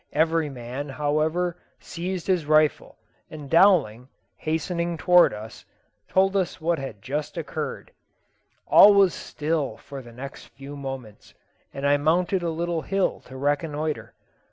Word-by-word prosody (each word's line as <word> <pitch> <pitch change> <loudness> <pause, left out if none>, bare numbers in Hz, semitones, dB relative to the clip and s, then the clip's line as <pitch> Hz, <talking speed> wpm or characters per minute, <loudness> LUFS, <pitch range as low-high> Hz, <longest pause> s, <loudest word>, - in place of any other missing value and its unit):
Every 160 0 +2
man, 130 +2 -6
however, 155 +5 -1 0.2
seized 180 +1 -5
his 180 -6 0
rifle, 155 0 +2 0.3
and 150 -2 -9
Dowling, 165 - +4 0.3
hastening 170 +2 -2
towards 175 -2 +5
us, 110 +2 -10 0.5
told 195 +1 +2
us 185 -3 -1
what 165 +1 0
had 135 -8 -8
just 145 +5 -4
occurred. - - -5 0.7
All 205 0 +8
was 195 -3 +5
still 155 -2 -3
for 140 -1 -9
the 120 -2 -13
next 135 +4 -9
few 140 +1 -11
moments, 135 -6 -8 0.4
and 140 +1 -5
I 145 0 +4
mounted 175 +5 +1
a 170 - -1
little 170 0 -2
hill 195 +3 -1
to 130 - -10
reconnoitre. 145 +2 -2
155 Hz, 135 wpm, -25 LUFS, 140-175 Hz, 0.7 s, All